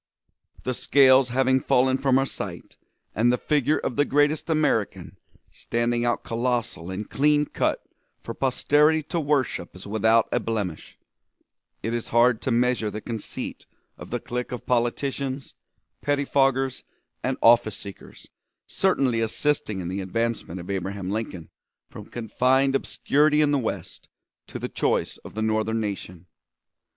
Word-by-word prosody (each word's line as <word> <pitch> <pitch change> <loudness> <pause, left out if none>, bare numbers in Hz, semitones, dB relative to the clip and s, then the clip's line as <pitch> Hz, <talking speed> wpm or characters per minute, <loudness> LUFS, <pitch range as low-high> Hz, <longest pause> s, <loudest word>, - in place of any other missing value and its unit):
The 130 - -1
scales 130 0 +5
having 130 +1 +2
fallen 130 +1 +2
from 135 -1 +3
our 135 - +2
sight - - -6 0.4
and 120 +4 +3
the 125 - +1
figure 150 +1 +1
of 125 - -3
the 145 - +5
greatest 145 +3 +1
American 150 -10 0 0.3
standing 120 0 -1
out 120 - 0
colossal 120 -6 -2
and 95 +3 -5
clean 150 +1 +2
cut - - -1 0.4
for 115 - -5
posterity 150 +5 +2
to 170 +3 -2
worship 140 - -1
as 90 - -10
without 110 +2 +3
a - - +2
blemish, 105 -8 -4 0.9
it 115 - -2
is 120 -1 -3
hard 120 0 +3
to - - -2
measure 120 -2 +1
the 105 - -5
conceit 110 0 -6 0.3
of - - -11
the - - -2
clique 125 0 -4
of 125 - -6
politicians, 130 +3 -1 0.5
pettifoggers, 135 -2 +1 0.4
and 130 0 -1
office 115 -2 +4
seekers 100 -1 -11 0.4
certainly 135 -11 +1
assisting 115 -3 0
in 85 - -5
the 95 +2 -3
advancement 110 -2 -2
of 90 +3 -6
Abraham 95 0 -3
Lincoln 100 -6 -5 0.4
from - - -9
confined 130 +4 +1
obscurity 150 +2 +2
in 150 -1 +3
the 145 - +2
West 115 - -5 0.4
to - - -7
the - - -4
choice - - -1
of - - -12
the 110 - -1
Northern 110 +1 0
nation. 95 -5 -5
120 Hz, 145 wpm, -25 LUFS, 110-135 Hz, 0.9 s, scales